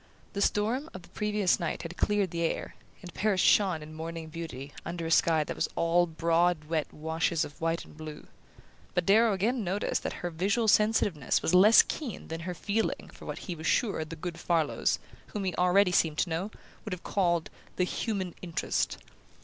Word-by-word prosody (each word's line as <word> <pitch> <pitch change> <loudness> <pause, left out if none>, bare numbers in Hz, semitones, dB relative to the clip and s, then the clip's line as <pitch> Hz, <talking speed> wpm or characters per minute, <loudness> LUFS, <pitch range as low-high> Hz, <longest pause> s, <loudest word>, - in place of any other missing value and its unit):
The 200 - -2
storm 230 +10 +1
of 185 - -8
the - - -16
previous 210 -3 +1
night 170 - -3
had 170 +1 -6
cleared 205 -3 +1
the 170 - -3
air, 165 - -2 0.3
and 175 -1 -9
Paris 205 -2 +1
shone 180 -5 +4
in 155 +1 -10
morning 160 0 -6
beauty 155 -4 -7
under 170 -1 -4
a 165 - -2
sky 160 -1 +4
that - - -5
was - - -1
all 170 +1 +3
broad 165 0 +1
wet 155 0 -2
washes 160 +1 -1
of 145 - -13
white 165 +1 -1
and - - -16
blue; 155 -1 -8 0.7
but 180 - +1
Darrow 220 +4 +5
again 220 +5 0
noticed 190 +3 -1
that - - -3
her 175 - -2
visual 200 +7 +1
sensitiveness 205 - +3
was 160 - +1
less 205 +5 +8
keen 265 - -6
than 165 0 -4
her 180 - -4
feeling 215 +5 -2
for - - -12
what - - -4
he 180 - -3
was 160 -1 -5
sure 200 -9 +1
the 160 +1 -8
good 170 +1 -6
Farlows 165 -4 +1 0.3
whom 210 - -4
he 185 -2 -1
already 180 +2 +4
seemed 160 -3 +2
to 175 - 0
know 175 +6 -1 0.3
would 210 - -4
have 180 - -7
called 175 -4 0 0.2
"the 180 - +1
human 190 -1 -2
interest." 170 -3 -1
175 Hz, 195 wpm, -29 LUFS, 165-200 Hz, 0.7 s, less